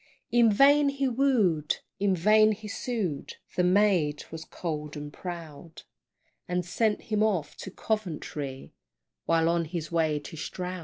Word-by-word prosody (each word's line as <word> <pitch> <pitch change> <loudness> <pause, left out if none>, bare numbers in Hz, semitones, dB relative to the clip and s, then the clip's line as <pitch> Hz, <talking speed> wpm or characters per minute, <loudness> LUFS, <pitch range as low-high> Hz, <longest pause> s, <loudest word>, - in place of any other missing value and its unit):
In 235 -2 +5
vain 280 +6 +5
he 275 -1 -1
wooed, 230 - +2 0.2
in 195 -1 +2
vain 215 +4 +5
he 210 +1 -9
sued, 200 - -3 0.2
The 180 - +2
maid 180 -6 +3
was 160 -1 -7
cold 150 -3 -5
and 145 0 -7
proud, 165 -3 -8 0.6
And 180 0 -1
sent 210 +4 0
him 215 -1 -1
off 185 -9 0
to - - -7
Coventry, 155 -10 -4 0.5
While 165 0 +3
on 170 0 +1
his 160 -1 -5
way 160 -3 +1
to 145 +2 -8
Stroud. 180 +3 -5
180 Hz, 145 wpm, -28 LUFS, 160-215 Hz, 0.6 s, In